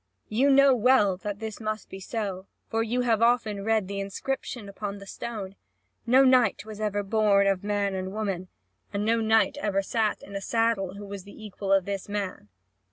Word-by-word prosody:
You 255 Hz, +6 st, +3 dB
know 275 Hz, 0 st, +6 dB
well 230 Hz, -5 st, +4 dB
that 205 Hz, +1 st, -5 dB
this 220 Hz, 0 st, -6 dB
must 215 Hz, -1 st, -3 dB
be 190 Hz, -, -9 dB
so, 195 Hz, -2 st, -4 dB, 0.2 s
for 225 Hz, -, +1 dB
you 235 Hz, +2 st, 0 dB
have 230 Hz, -3 st, +2 dB
often 225 Hz, -4 st, +2 dB
read 220 Hz, -2 st, +1 dB
the 200 Hz, 0 st, -4 dB
inscription 205 Hz, +3 st, -4 dB
upon 200 Hz, 0 st, -5 dB
the 200 Hz, -, -11 dB
stone. 200 Hz, -2 st, -6 dB, 0.5 s
No 260 Hz, +3 st, +6 dB
knight 250 Hz, -6 st, +4 dB
was 215 Hz, -1 st, -9 dB
ever 205 Hz, -1 st, 0 dB
born 200 Hz, -1 st, +3 dB
of 195 Hz, -1 st, +1 dB
man 205 Hz, -1 st, 0 dB
and 190 Hz, 0 st, -3 dB
woman, 195 Hz, -4 st, -3 dB, 0.4 s
and 205 Hz, 0 st, -2 dB
no 230 Hz, +1 st, +2 dB
knight 220 Hz, -2 st, +3 dB
ever 195 Hz, -2 st, 0 dB
sat 215 Hz, +1 st, -1 dB
in 200 Hz, -, -10 dB
a 195 Hz, -, -3 dB
saddle, 225 Hz, -4 st, 0 dB
who 205 Hz, 0 st, -8 dB
was 200 Hz, -1 st, -7 dB
the 205 Hz, +2 st, -12 dB
equal 200 Hz, -1 st, -4 dB
of 195 Hz, -2 st, +4 dB
this 200 Hz, 0 st, -4 dB
man." 200 Hz, -, -4 dB
205 Hz, 195 wpm, -27 LUFS, 195-225 Hz, 0.5 s, know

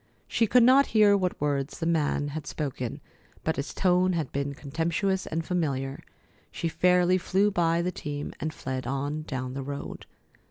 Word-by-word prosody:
She 225 Hz, -, +2 dB
could 245 Hz, +3 st, +5 dB
not 265 Hz, +3 st, +6 dB
hear 205 Hz, -1 st, +7 dB
what 185 Hz, -2 st, -1 dB
words 140 Hz, -1 st, -1 dB
the 165 Hz, -, -3 dB
man 150 Hz, -3 st, +1 dB
had 150 Hz, 0 st, -6 dB
spoken, 130 Hz, -5 st, -4 dB, 0.4 s
but 160 Hz, -, -1 dB
his 140 Hz, -, -3 dB
tone 185 Hz, 0 st, +2 dB
had 160 Hz, -6 st, -2 dB
been 140 Hz, 0 st, -2 dB
contemptuous 170 Hz, +7 st, -1 dB
and 165 Hz, +1 st, -2 dB
familiar. 140 Hz, -6 st, -2 dB, 0.5 s
She 165 Hz, -, -3 dB
fairly 180 Hz, +2 st, +3 dB
flew 195 Hz, +3 st, +2 dB
by 170 Hz, -2 st, +2 dB
the 180 Hz, -, -1 dB
team, 145 Hz, -3 st, -5 dB
and 155 Hz, +2 st, -2 dB
fled 130 Hz, -4 st, -5 dB
on 140 Hz, +3 st, -2 dB
down 130 Hz, -2 st, -4 dB
the 135 Hz, -, -4 dB
road. 140 Hz, +1 st, -6 dB
160 Hz, 170 wpm, -27 LUFS, 140-180 Hz, 0.5 s, hear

